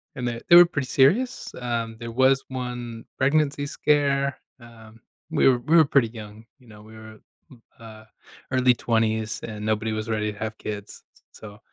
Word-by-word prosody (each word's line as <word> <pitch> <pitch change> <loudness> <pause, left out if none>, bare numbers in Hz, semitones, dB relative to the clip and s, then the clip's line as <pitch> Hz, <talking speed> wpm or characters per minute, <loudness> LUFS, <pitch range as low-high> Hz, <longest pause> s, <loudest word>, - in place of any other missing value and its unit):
and 125 -3 -4
that 120 0 -4
they 175 - +8
were 175 - +10
pretty 140 -6 -4
serious. 225 - +1
Um, 115 -2 -3
there 115 -1 -7
was 130 +3 +3
1 125 -3 -6
pregnancy 145 +1 +1
scare, 140 -2 0 0.2
um, 115 -1 -16 0.3
we - - +3
were 125 -2 +2
we 155 +7 +2
were 160 - +6
pretty 135 -4 +2
young, 110 -1 -11 0.2
you 125 - -22
know, 105 -1 -14
we 110 +1 -15
were, 110 0 -13 0.3
m 125 -3 -17 0.2
uh, 110 -1 -13 0.5
early 130 -1 +3
20s, 110 -2 -1
and 105 -2 -7
nobody 110 0 -1
was 110 +1 -4
ready 105 -1 -1
to - - -16
have 110 0 -5
kids, 105 -1 -8 0.3
s - - -15
so, 105 -1 -11
115 Hz, 185 wpm, -24 LUFS, 110-135 Hz, 0.5 s, were